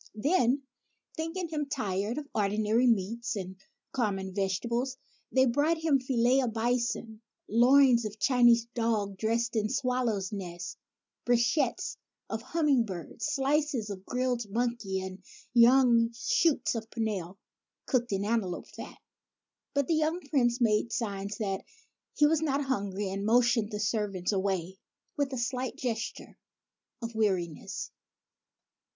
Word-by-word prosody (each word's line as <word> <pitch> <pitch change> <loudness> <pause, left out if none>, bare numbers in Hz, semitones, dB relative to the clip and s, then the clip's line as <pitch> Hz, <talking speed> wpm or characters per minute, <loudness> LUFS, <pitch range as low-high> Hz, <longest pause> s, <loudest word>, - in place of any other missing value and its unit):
Then, 275 +1 +2 0.5
thinking 330 +3 -3
him 300 -2 -2
tired 210 -3 -2
of 300 -1 -5
ordinary 215 +4 +2
meats 230 +2 0
and 190 -2 -5 0.4
common 195 -6 -1
vegetables, 235 +7 -1 0.3
they 260 0 +4
brought 290 +7 +2
him 320 -4 +2
filets 255 0 +2
of 235 -3 -2
bison, 230 -1 -1 0.3
loins 245 +2 +5
of 215 0 -5
Chinese 240 -2 +4
dogs, 215 -4 -1
dressed 230 +1 0
with 215 -2 0
swallows' 250 -7 0
nests, 180 -3 -6 0.5
brochets 245 +2 +1 0.3
of 220 0 -2
humming 285 -2 +2
birds, 190 - -5
slices 275 -5 0
of 190 -1 -7
grilled 245 -1 -1
monkeys 225 -4 -1
and 190 0 -8 0.3
young 235 -1 +5
shoots 330 - +1
of 225 -1 -5
pimpernel, 200 -6 -3 0.5
cooked 245 -4 0
in 195 0 0
antelope 205 -5 -1
fat. - - -9 0.8
But 280 -1 +2
the 330 - +1
young 315 +2 +1
Prince 240 -4 +2
made 225 -1 +2
signs 200 -3 -3
that 195 -4 -2 0.5
he 295 - +5
was 310 +1 +3
not 290 -2 0
hungry, 200 -6 -2
and 195 +1 -3
motioned 235 0 +3
the 210 -2 -4
servants 210 -4 -1
away 190 -2 -1 0.4
with 285 -1 -1
a 260 - -3
slight 250 +1 -2
gesture 230 -3 -4 0.6
of 230 0 -4
weariness. 185 -7 -2
235 Hz, 130 wpm, -29 LUFS, 205-260 Hz, 0.8 s, loins